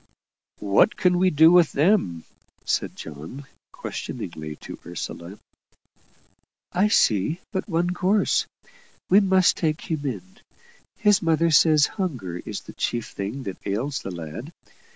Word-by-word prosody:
"What 100 - +3
can 180 -3 +2
we 185 0 +4
do 160 0 +6
with 175 -3 +5
them?" 145 - +2 0.4
said - - -1
John, 80 - -9 0.3
questioningly 75 -1 -6
to - - -9
Ursula. 85 +2 -7 1.4
"I 190 +4 +3
see 135 - +2
but 190 0 -3
one 175 +1 0
course. 190 +3 +1 0.6
We 195 - +8
must 190 -2 +3
take 155 -2 -1
him 155 -2 -2
in; 190 - -7 0.6
his 205 -3 +3
mother 165 0 +2
says 155 -1 +5 0.2
hunger 115 - -3
is - - -6
the - - -12
chief 120 -2 -2
thing 105 +8 -5
that 95 -5 -6
ails 125 +8 -2
the - - -6
lad. 85 - -7
155 Hz, 130 wpm, -24 LUFS, -, 1.4 s, We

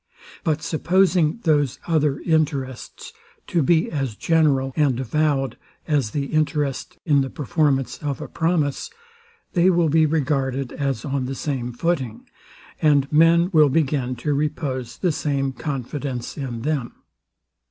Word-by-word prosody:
But 155 -4 0
supposing 180 +2 +2
those 145 -5 +2
other 150 -4 +1
interests 145 -6 -2 0.3
to 170 - 0
be 160 +3 +2
as 135 -7 -2
general 140 -3 +2
and 140 -5 +2
avowed 135 +1 0 0.3
as 145 -8 +1
the 140 +5 -2
interest 150 +2 -1
in 145 -4 +4
the 135 - -2
performance 145 -2 0
of 145 -4 -3
a - - -6
promise, 160 -4 -1 0.6
they 180 0 +4
will 170 -3 +3
be 155 +1 +4
regarded 135 -4 -1
as 135 -5 -2
on 140 -2 -1
the 135 +1 -4
same 130 -4 -3
footing, 130 -4 -2 0.5
and 145 -2 +3
men 165 +3 +4
will 155 -3 +6
begin 135 -4 0
to 150 - +2
repose 135 -4 -2
the 180 - +1
same 140 -3 -1
confidence 135 -1 -4
in 120 -5 -5
them. 145 -5 -2
145 Hz, 135 wpm, -22 LUFS, 135-155 Hz, 0.6 s, will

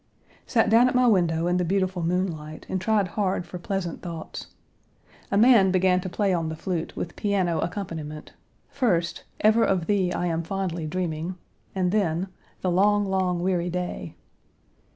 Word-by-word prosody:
Sat 225 -3 +3
down 235 +3 +6
at 255 - -1
my 250 0 +4
window 170 -7 +3
in 175 +1 +2
the 180 - +1
beautiful 185 0 0
moonlight, 165 -3 -2
and 185 - -2
Page 185 - -9
173 210 -3 +1
tried - - +3
hard 185 -2 0
for 180 - -8
pleasant 180 -2 -3
thoughts. 170 -3 -7 0.8
A 200 - +1
man 220 -4 +6
began 185 0 +3
to 185 - -5
play 195 +2 +1
on 165 -2 -1
the 160 - -4
flute, 170 0 -3
with 170 - -5
piano 185 -5 0
accompaniment, 165 -4 -5 0.3
first, 180 -11 0 0.2
"Ever 220 +2 +5
of 185 -4 +1
thee 190 -3 +1
I 175 - -1
am 165 -1 0
fondly 175 -2 -3
dreaming," 170 0 -3 0.4
and 180 -2 +1
then, 190 -3 0 0.3
"The 185 - 0
long, 205 +3 +3
long, 185 -2 0
weary 180 -2 0
day." 175 - -4
180 Hz, 175 wpm, -25 LUFS, 170-195 Hz, 0.8 s, down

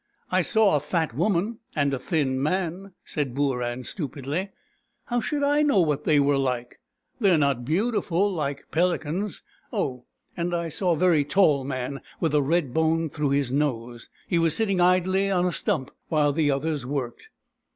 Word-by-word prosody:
" - - -42
1 - - +2
saw 220 -7 +4
a - - +3
fat 160 0 -1
woman, 200 - 0 0.2
and 140 -2 +1
a 135 - -1
thin 135 -3 0
man," 185 +4 -2
said 140 -5 -3
Booran 125 -3 -1
stupidly. 150 +4 -3 0.3
" - - -48
How 245 -2 -1
should 285 +5 -2
I 290 +1 +3
know 290 -9 +3
what 150 -3 0
they 150 -2 +4
were 140 0 +3
like? 125 -2 -2 0.4
They 205 -5 +4
are 175 - +5
not 140 -4 +1
beautiful 195 - +1
like 140 -4 -3
peli 175 +2 +2
cans. 175 +6 -4 0.3
Oh, 125 -2 -2 0.3
and 175 0 -1
I 170 -1 -2
saw 175 +3 +1
a - - -2
very 170 -3 +4
tall 145 -2 +3
man, 130 0 -4 0.2
with 160 -2 0
a 150 - +4
red 145 -2 0
bone 160 -1 +1
through 150 -2 -1
his 140 -2 +1
nose. 120 -4 -2 0.2
He 170 - +1
was 165 -1 +2
sitting 195 -5 +1
idly 185 +2 +3
on 180 -2 +2
a 180 - +1
stump 170 - -1 0.2
while 150 -3 +2
the 150 -1 +2
others 145 0 -1
worked." 125 -2 -4
155 Hz, 185 wpm, -25 LUFS, 140-180 Hz, 0.4 s, are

